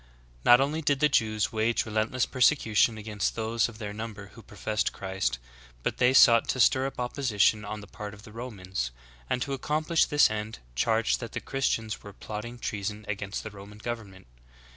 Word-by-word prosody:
^. -, -, -27 dB
13. -, -, -27 dB, 0.4 s
Not 120 Hz, 0 st, +8 dB
only 150 Hz, +4 st, 0 dB
did 145 Hz, -2 st, +1 dB
the 150 Hz, 0 st, +4 dB
Jews 110 Hz, -5 st, +1 dB
wage 110 Hz, +1 st, +1 dB
relentless 110 Hz, +3 st, 0 dB
persecution 120 Hz, -4 st, +3 dB
against 105 Hz, -1 st, -2 dB
those 115 Hz, +1 st, 0 dB
of 110 Hz, -, -12 dB
their 105 Hz, -2 st, -5 dB
number 105 Hz, -2 st, -7 dB
who 115 Hz, -, -12 dB
professed 105 Hz, +1 st, -2 dB
Christ, 95 Hz, -7 st, -2 dB, 0.5 s
but -, -, -1 dB
they 125 Hz, +1 st, +4 dB
sought 115 Hz, -3 st, +7 dB
to 130 Hz, -, -1 dB
stir 130 Hz, +2 st, +4 dB
up 135 Hz, -, -8 dB
opposition 115 Hz, -4 st, +1 dB
on 105 Hz, 0 st, -5 dB
the -, -, -10 dB
part 105 Hz, 0 st, -8 dB
of 105 Hz, -, -16 dB
the 110 Hz, -, -12 dB
Romans, 95 Hz, -, -4 dB, 0.4 s
and 125 Hz, -, 0 dB
to 140 Hz, -, -4 dB
accomplish 155 Hz, +4 st, +1 dB
this 145 Hz, -6 st, +4 dB
end 110 Hz, +1 st, -4 dB, 0.2 s
charged 110 Hz, -, +1 dB
that 115 Hz, -3 st, -7 dB
the -, -, -2 dB
Christians 115 Hz, -5 st, -1 dB
were 100 Hz, -, -11 dB
plotting 110 Hz, +4 st, -7 dB
treason 105 Hz, -1 st, -4 dB
against 100 Hz, -1 st, -4 dB
the 110 Hz, -, -7 dB
Roman 100 Hz, +1 st, -12 dB
government. 105 Hz, -4 st, -6 dB
110 Hz, 190 wpm, -28 LUFS, 105-125 Hz, 0.5 s, Not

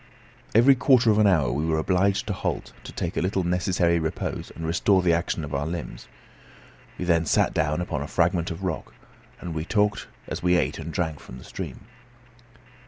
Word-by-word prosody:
Every 120 Hz, +5 st, +7 dB
quarter 130 Hz, -3 st, +4 dB
of 105 Hz, -, +2 dB
an 105 Hz, -, +5 dB
hour 80 Hz, -9 st, +3 dB
we 75 Hz, -, -1 dB
were 80 Hz, -1 st, +1 dB
obliged 95 Hz, +5 st, +1 dB
to 105 Hz, -, -2 dB
halt, -, -, -3 dB
to -, -, -7 dB
take -, -, -4 dB
a -, -, 0 dB
little 95 Hz, +1 st, 0 dB
necessary 90 Hz, -1 st, +1 dB
repose 80 Hz, -1 st, -4 dB
and 80 Hz, -, -6 dB
restore 90 Hz, +3 st, +2 dB
the 85 Hz, -2 st, +3 dB
action 85 Hz, -1 st, -1 dB
of 75 Hz, -, -6 dB
our 70 Hz, +2 st, -1 dB
limbs. 85 Hz, -1 st, -6 dB, 0.9 s
We 90 Hz, -, -3 dB
then 85 Hz, -2 st, +2 dB
sat -, -, +2 dB
down 75 Hz, +2 st, 0 dB
upon 80 Hz, -5 st, -3 dB
a 70 Hz, -, -4 dB
fragment 85 Hz, 0 st, +1 dB
of 85 Hz, +2 st, -6 dB
rock, 90 Hz, -4 st, -4 dB, 0.4 s
and 85 Hz, -, -6 dB
we 80 Hz, -1 st, -3 dB
talked 105 Hz, +4 st, 0 dB, 0.2 s
as -, -, -5 dB
we 90 Hz, 0 st, +3 dB
ate 70 Hz, -1 st, -1 dB
and 80 Hz, +1 st, -6 dB
drank 80 Hz, -3 st, -2 dB
from 65 Hz, -, -11 dB
the 65 Hz, -, -12 dB
stream. -, -, -7 dB
85 Hz, 200 wpm, -25 LUFS, 80-95 Hz, 0.9 s, Every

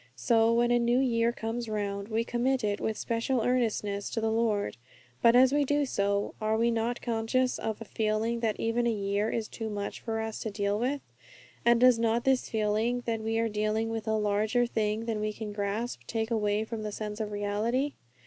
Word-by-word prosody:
So 225 Hz, -, +3 dB
when 240 Hz, +1 st, +3 dB
a 240 Hz, -, +4 dB
new 240 Hz, +1 st, +2 dB
year 235 Hz, -3 st, +2 dB
comes 230 Hz, 0 st, -4 dB
round, 200 Hz, -1 st, -2 dB
we 225 Hz, +1 st, 0 dB
commit 245 Hz, +2 st, 0 dB
it 205 Hz, -1 st, -1 dB
with 220 Hz, -, -1 dB
special 230 Hz, +2 st, 0 dB
earnestness 220 Hz, -5 st, 0 dB
to -, -, -2 dB
the 220 Hz, 0 st, 0 dB
Lord. 220 Hz, -, 0 dB, 0.5 s
But 235 Hz, 0 st, +6 dB
as 260 Hz, +2 st, +6 dB
we 290 Hz, 0 st, +3 dB
do 290 Hz, +1 st, +1 dB
so, 200 Hz, -4 st, 0 dB
are 215 Hz, 0 st, +1 dB
we 235 Hz, +1 st, +2 dB
not 230 Hz, +1 st, -1 dB
conscious 240 Hz, +2 st, 0 dB
of 220 Hz, -1 st, -3 dB
a 225 Hz, -, -7 dB
feeling 220 Hz, +2 st, -1 dB
that 225 Hz, -2 st, -1 dB
even 235 Hz, +1 st, +1 dB
a -, -, +3 dB
year 205 Hz, 0 st, 0 dB
is 225 Hz, -2 st, -2 dB
too 225 Hz, -1 st, -5 dB
much 205 Hz, -1 st, -4 dB
for 225 Hz, -1 st, -3 dB
us 220 Hz, 0 st, -4 dB
to 220 Hz, -, -3 dB
deal 200 Hz, 0 st, -1 dB
with? 270 Hz, +4 st, -1 dB, 0.6 s
And 235 Hz, 0 st, +5 dB
does 250 Hz, -1 st, +6 dB
not 230 Hz, +1 st, +1 dB
this 265 Hz, -1 st, +2 dB
feeling, 220 Hz, +3 st, 0 dB
that 225 Hz, -1 st, -1 dB
we 225 Hz, +1 st, -1 dB
are 230 Hz, 0 st, +2 dB
dealing 215 Hz, +1 st, -1 dB
with 225 Hz, -1 st, -4 dB
a 220 Hz, 0 st, +2 dB
larger 215 Hz, +3 st, +1 dB
thing 220 Hz, -1 st, -1 dB
than 225 Hz, -2 st, -2 dB
we 215 Hz, 0 st, -1 dB
can 210 Hz, -1 st, -6 dB
grasp, 205 Hz, -, -2 dB
take 225 Hz, 0 st, -2 dB
away 210 Hz, -1 st, +1 dB
from 225 Hz, 0 st, -5 dB
the 210 Hz, 0 st, -4 dB
sense 210 Hz, 0 st, -5 dB
of 215 Hz, -1 st, -3 dB
reality? 215 Hz, +7 st, -1 dB
225 Hz, 210 wpm, -29 LUFS, 210-235 Hz, 0.6 s, But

